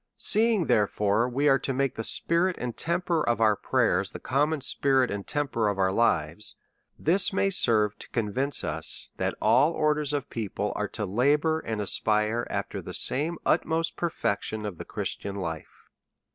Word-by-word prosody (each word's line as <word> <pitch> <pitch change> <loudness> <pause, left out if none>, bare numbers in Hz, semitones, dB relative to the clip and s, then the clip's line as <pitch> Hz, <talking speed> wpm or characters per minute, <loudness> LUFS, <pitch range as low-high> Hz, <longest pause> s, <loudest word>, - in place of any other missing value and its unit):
Seeing, 220 -4 +1
therefore, 105 +1 +1
we 140 +4 0
are 135 -2 +5
to 135 - -3
make 135 -1 0
the 115 - -5
spirit 170 +9 +2
and 120 -2 -4
temper 170 -1 -1
of 120 -5 0
our 110 -2 +4
prayers - - +1
the - - -9
conmion 145 +2 0
spirit 135 -2 +2
and 100 -1 -5
temper 140 -7 -1
of 100 -1 -1
our 95 -1 +2
lives, 95 -3 0 0.4
this 185 +5 +2
may 195 0 +1
serve 105 - +2
to - - -8
convince 125 +5 -2
us - - -1
that - - -1
all 125 +9 +4
or 155 -1 +2
ders 150 -1 -1
of 145 -1 -2
people 105 -2 -3
are 105 - -2
to 105 +1 -3
labour 145 - +2
and 110 -7 -4
aspire 105 +3 +1
after - - -4
the - - -7
same 160 +5 +1
utmost 165 +1 +1
perfection 110 -9 -2
of 100 -5 -6
the - - -6
Christian 100 -1 -4
life. 80 -5 -7
125 Hz, 170 wpm, -27 LUFS, 105-155 Hz, 0.4 s, are